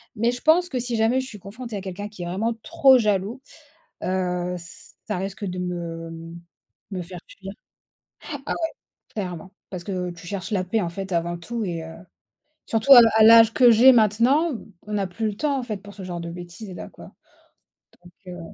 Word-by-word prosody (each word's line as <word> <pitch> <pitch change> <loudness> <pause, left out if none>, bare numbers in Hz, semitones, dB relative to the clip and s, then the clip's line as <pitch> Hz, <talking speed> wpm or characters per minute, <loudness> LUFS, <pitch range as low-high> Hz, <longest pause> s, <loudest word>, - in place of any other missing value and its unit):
Mais, 230 +3 +1
je 245 - -7
pense 350 +3 +4
que, 255 - -2
si 240 -1 -2
jamais 235 +4 +2
je 260 - -7
suis 210 -5 -10
confrontée 215 +3 -7
à 195 - -5
quelqu'un 200 +2 -6
qui 185 -4 -8
est - - -4
vraiment 200 +7 -1
trop 265 -2 +5
jaloux, 210 +3 0 0.6
heu, 180 -1 -1
ça 170 +1 -9
risque 195 +2 -5
de 180 0 -4
me 165 -2 -5 0.6
me 185 - -3
faire 175 +1 -9
fuir. - - -10 0.9
Ah - - -4
ouais, 325 -1 -2 0.5
clairement. 185 -3 -5 0.2
Parce 180 -2 -6
que 180 -2 -3
tu 170 0 -12
cherches 195 +1 -5
la 195 -4 0
paix, 215 +4 0
en 175 - -1
fait, 190 +2 -6
avant 170 0 -1
tout 230 +6 -4
et 170 -4 -4
heu, 165 - -9 0.7
surtout 230 +5 +5
à 245 - +11
la 225 - +6
à 220 - +7
l'âge 225 0 +8
que 245 -2 +6
j'ai 245 +4 +8
maintenant, 245 - +3 0.3
on 210 - -5
n'a 200 -2 0
plus 220 +5 -3
le 210 - -3
temps, 280 +3 0
en - - -4
fait, 220 -4 -4
pour 205 +1 -13
ce 195 - -9
genre 175 -2 -5
de 170 - -6
bêtises 175 +3 -9
là, - - -7
quoi. - - -14 0.9
Donc, 175 - -15
heu 180 0 -7
200 Hz, 205 wpm, -24 LUFS, 180-230 Hz, 0.9 s, à